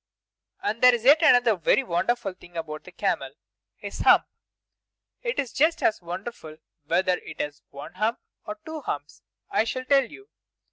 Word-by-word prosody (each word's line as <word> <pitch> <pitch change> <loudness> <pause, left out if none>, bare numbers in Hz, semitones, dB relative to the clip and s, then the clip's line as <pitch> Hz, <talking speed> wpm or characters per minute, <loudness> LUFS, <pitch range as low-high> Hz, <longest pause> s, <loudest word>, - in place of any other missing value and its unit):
And 215 +3 -2
there 250 -1 +7
is 230 - -6
yet 295 +5 +7
another 245 -7 +5
very 180 - +2
wonderful 195 +1 -1
thing 175 -2 -14
about 155 -2 -6
the - - -11
camel. - - -2 0.4
His - - -8
hump! - - +5 1.0
It 480 0 -3
is 270 -5 -2
just 320 +4 +2
as 215 - +2
wonderful 175 -2 -7 0.3
whether 180 +3 +1
it - - -11
is 145 -1 -4
one 145 +4 -10
hump 215 +6 0 0.3
or 315 0 -6
two 315 -1 -6
humps. 145 - -6 0.3
I - - +3
shall 255 +3 -4
tell 275 0 +4
you. 400 - -14
220 Hz, 170 wpm, -25 LUFS, 170-265 Hz, 1.0 s, there